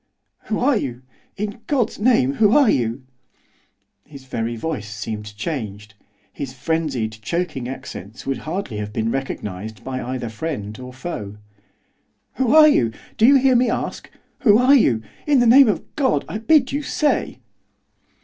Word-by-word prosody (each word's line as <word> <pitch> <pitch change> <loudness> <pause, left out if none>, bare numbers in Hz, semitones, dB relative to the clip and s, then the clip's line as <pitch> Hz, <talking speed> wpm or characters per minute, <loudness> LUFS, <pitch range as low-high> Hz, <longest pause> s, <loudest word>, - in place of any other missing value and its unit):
'Who 215 - -1
are 260 -1 +2
you? 130 - -5 0.3
In 210 +2 -4
God's 260 -9 0
name, 210 - +3
who 210 -2 +4
are 275 -7 +5
you?' 120 +1 -1 1.0
His 140 -3 -13
very 120 -2 -3
voice 120 -5 -4
seemed 105 -1 -6
changed; 105 - -5 0.4
his 135 -2 -6
frenzied, 135 -6 -2
choking 165 -3 -3
accents 125 -5 -8
would 135 -1 -2
hardly 160 - -4
have 105 0 -4
been 110 +1 -1
recognised 110 -6 -5
by 130 0 -4
either 125 0 -4
friend 110 -4 -5
or 125 0 -8
foe. 115 -7 -6 1.0
'Who 260 +2 +2
are 310 -1 +9
you? 120 - +3 0.3
Do 225 - +6
you 280 - +7
hear 265 -1 +4
me 245 0 +3
ask, - - -4 0.3
who 210 -5 +5
are 255 +3 +5
you? 120 - +4 0.2
In 285 -3 +4
the 245 - +4
name 255 +3 +7
of 195 -7 0
God, 270 -3 +1
I 210 - -4
bid 270 +2 +3
you 285 +2 -1
say! 295 0 0
140 Hz, 160 wpm, -21 LUFS, -, 1.0 s, are